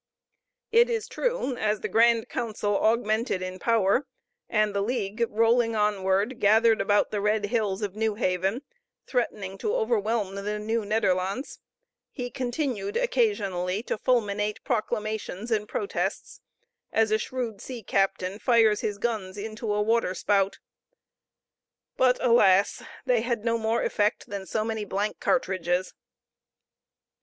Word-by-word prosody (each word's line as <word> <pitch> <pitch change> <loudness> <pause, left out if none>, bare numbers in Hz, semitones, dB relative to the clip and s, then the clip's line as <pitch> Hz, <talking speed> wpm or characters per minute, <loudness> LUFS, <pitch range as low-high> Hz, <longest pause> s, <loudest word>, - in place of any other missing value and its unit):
It 470 +2 +5
is 455 -2 -2
true, - - -1
as 215 -2 0
the - - -2
grand 230 0 +3
council 215 -3 -2
augmented 220 -2 +1
in 185 0 -6
power, 230 +4 +2 0.4
and 215 -2 +2
the 200 - 0
league, 215 -1 -1
rolling 230 +1 +2
onward, 205 +2 +1
gathered 220 +2 +4
about 205 0 +2
the 210 - -1
red 210 0 +1
hills 210 -2 -1
of 200 -1 -3
New 220 -1 0
Haven, 190 +4 -1 0.4
threatening 200 -6 -2
to 435 +2 -1
overwhelm 220 - 0
the 205 +2 -3
Nieuw 220 +1 -2
Nederlandts, 200 +2 -1 0.5
he 245 -3 -6
continued 245 -6 -2
occasionally 200 - 0
to - - -2
fulminate 210 -4 0
proclamations 215 -2 -3
and 210 -1 0
protests, 405 - -3 0.5
as 220 -1 +2
a 215 - +3
shrewd 235 -3 -4
sea 245 -4 -7
captain 195 0 0
fires 225 -4 +4
his 205 -1 -2
guns 205 -4 -3
into 215 +1 -4
a 210 0 +1
water 225 -4 +1
spout, 195 -1 +1 1.4
but, 250 -1 +3
alas! 200 -5 +4 0.2
they 245 -3 +2
had 235 -2 -2
no 230 0 +2
more 225 +1 0
effect 210 0 0
than 200 -2 -5
so 215 -1 -1
many 220 -1 -2
blank 205 +1 -2
cartridges. 185 -7 0
215 Hz, 135 wpm, -26 LUFS, 200-235 Hz, 1.4 s, It